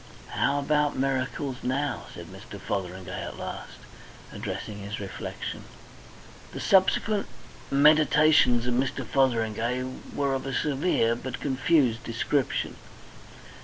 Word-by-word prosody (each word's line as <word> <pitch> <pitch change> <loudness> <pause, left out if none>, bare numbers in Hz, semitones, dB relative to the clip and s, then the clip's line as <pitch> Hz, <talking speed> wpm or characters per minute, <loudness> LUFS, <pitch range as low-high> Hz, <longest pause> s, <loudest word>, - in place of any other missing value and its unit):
"How 140 - +1
about 150 +1 +1
miracles 130 0 -1
now?" 140 +3 -1
said - - -9
Mr. - - -10
Fotheringay 90 -2 -4
at - - -6
last, - - -7 0.6
addressing 105 -1 -5
his 100 +2 -5
reflection. 100 -2 -6 0.9
The - - -5
subsequent 200 +2 +3 0.4
meditations 150 -3 +5
of 125 - 0
Mr. 130 +1 0
Fotheringay 120 -1 +1 0.3
were 140 -1 +1
of 135 0 -2
a 135 - -2
severe 140 -6 +2
but 130 +2 -6
confused 130 -3 +2
description. 120 +4 -1
130 Hz, 110 wpm, -27 LUFS, 115-145 Hz, 0.9 s, meditations